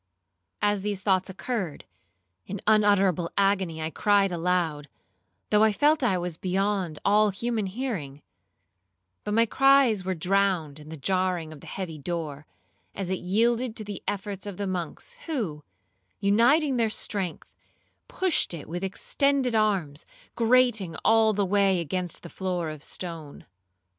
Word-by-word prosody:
As 205 Hz, -1 st, +2 dB
these 200 Hz, -1 st, -3 dB
thoughts 190 Hz, -2 st, +2 dB
occurred, 190 Hz, -, -4 dB, 0.6 s
in 200 Hz, +1 st, -5 dB
unutterable 200 Hz, -5 st, +3 dB
agony 190 Hz, -5 st, +1 dB
I 160 Hz, -, -3 dB
cried 200 Hz, 0 st, +2 dB
aloud, 165 Hz, -4 st, -1 dB, 0.6 s
though 210 Hz, -, +5 dB
I 220 Hz, 0 st, +5 dB
felt 295 Hz, +9 st, +3 dB
I 230 Hz, -8 st, +2 dB
was 175 Hz, -2 st, -4 dB
beyond 190 Hz, -3 st, -1 dB
all 210 Hz, +1 st, +4 dB
human 220 Hz, +1 st, -2 dB
hearing; 185 Hz, -, -5 dB, 1.0 s
but 210 Hz, -, -2 dB
my 230 Hz, +1 st, +5 dB
cries 270 Hz, -5 st, +4 dB
were 185 Hz, 0 st, -2 dB
drowned 180 Hz, -4 st, 0 dB
in 150 Hz, 0 st, -12 dB
the 160 Hz, -, -7 dB
jarring 180 Hz, +1 st, -1 dB
of 145 Hz, -, -13 dB
the -, -, -13 dB
heavy 175 Hz, -5 st, -5 dB
door, 150 Hz, -2 st, -5 dB, 0.5 s
as 190 Hz, -2 st, -3 dB
it 190 Hz, -, -1 dB
yielded 230 Hz, +5 st, +1 dB
to 220 Hz, -, -3 dB
the 205 Hz, -2 st, -7 dB
efforts 200 Hz, 0 st, -4 dB
of 200 Hz, -3 st, -6 dB
the 205 Hz, -, -2 dB
monks, 180 Hz, -, -4 dB, 0.2 s
who, 200 Hz, -, -3 dB, 0.6 s
uniting 250 Hz, +8 st, +3 dB
their 230 Hz, -2 st, +2 dB
strength, 195 Hz, -5 st, -2 dB, 0.6 s
pushed 370 Hz, -, 0 dB
it 155 Hz, -, -9 dB
with 175 Hz, +3 st, -5 dB
extended 265 Hz, +6 st, +1 dB
arms, 195 Hz, -9 st, 0 dB, 0.3 s
grating 230 Hz, -7 st, +2 dB
all 225 Hz, 0 st, +5 dB
the 205 Hz, -1 st, 0 dB
way 195 Hz, -1 st, +3 dB
against 175 Hz, +2 st, -3 dB
the 170 Hz, -, -8 dB
floor 180 Hz, -4 st, -3 dB
of 150 Hz, -1 st, -10 dB
stone. 165 Hz, -5 st, -6 dB
195 Hz, 145 wpm, -26 LUFS, 175-215 Hz, 1.0 s, though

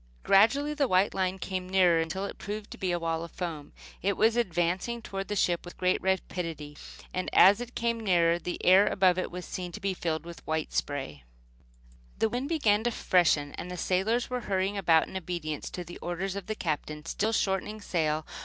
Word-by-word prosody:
Gradually 275 Hz, +10 st, +4 dB
the 290 Hz, -2 st, +1 dB
white 185 Hz, 0 st, +3 dB
line 190 Hz, 0 st, -1 dB
came 185 Hz, -1 st, -4 dB
nearer, 180 Hz, -3 st, +4 dB
until 190 Hz, +4 st, -3 dB
it -, -, -7 dB
proved 210 Hz, 0 st, -6 dB
to -, -, -8 dB
be 185 Hz, -2 st, 0 dB
a 175 Hz, -, +1 dB
wall 165 Hz, -1 st, -2 dB
of 170 Hz, -, -7 dB
foam. 160 Hz, -4 st, -6 dB, 0.3 s
It 195 Hz, +1 st, 0 dB
was 225 Hz, +1 st, +4 dB
advancing 185 Hz, +2 st, 0 dB
toward 195 Hz, -3 st, -5 dB
the 210 Hz, -, -2 dB
ship 175 Hz, -3 st, +1 dB
with 175 Hz, -, -11 dB
great 185 Hz, 0 st, +1 dB
rapidity; 165 Hz, -5 st, -2 dB, 0.4 s
and 185 Hz, -, -2 dB
as 200 Hz, +5 st, +7 dB
it 240 Hz, 0 st, -8 dB
came 235 Hz, 0 st, 0 dB
nearer 175 Hz, -5 st, +3 dB
the 175 Hz, -, -4 dB
air 190 Hz, +3 st, +7 dB
above 185 Hz, -3 st, +3 dB
it -, -, -2 dB
was 180 Hz, 0 st, -7 dB
seen 180 Hz, -1 st, -5 dB
to -, -, -6 dB
be 195 Hz, 0 st, -1 dB
filled 165 Hz, -2 st, -3 dB
with 170 Hz, 0 st, -9 dB
flying 160 Hz, 0 st, -1 dB
spray. 135 Hz, -, -3 dB, 0.9 s
The 225 Hz, -, +2 dB
wind 250 Hz, +5 st, -3 dB
began 220 Hz, -10 st, +2 dB
to -, -, +3 dB
freshen, 160 Hz, -9 st, +2 dB
and 180 Hz, -, -6 dB
the 180 Hz, -, -6 dB
sailors 200 Hz, +8 st, +1 dB
were 250 Hz, -1 st, -3 dB
hurrying 190 Hz, +1 st, 0 dB
about 165 Hz, -5 st, +3 dB
in -, -, -11 dB
obedience 170 Hz, -4 st, -4 dB
to 180 Hz, -, -6 dB
the 175 Hz, 0 st, -10 dB
orders 185 Hz, +2 st, -3 dB
of 200 Hz, -2 st, -6 dB
the 215 Hz, -, -2 dB
Captain, 150 Hz, -3 st, -3 dB
still 215 Hz, +6 st, -1 dB
shortening 210 Hz, 0 st, -1 dB
sail. 155 Hz, -5 st, -1 dB
185 Hz, 205 wpm, -29 LUFS, 170-205 Hz, 0.9 s, as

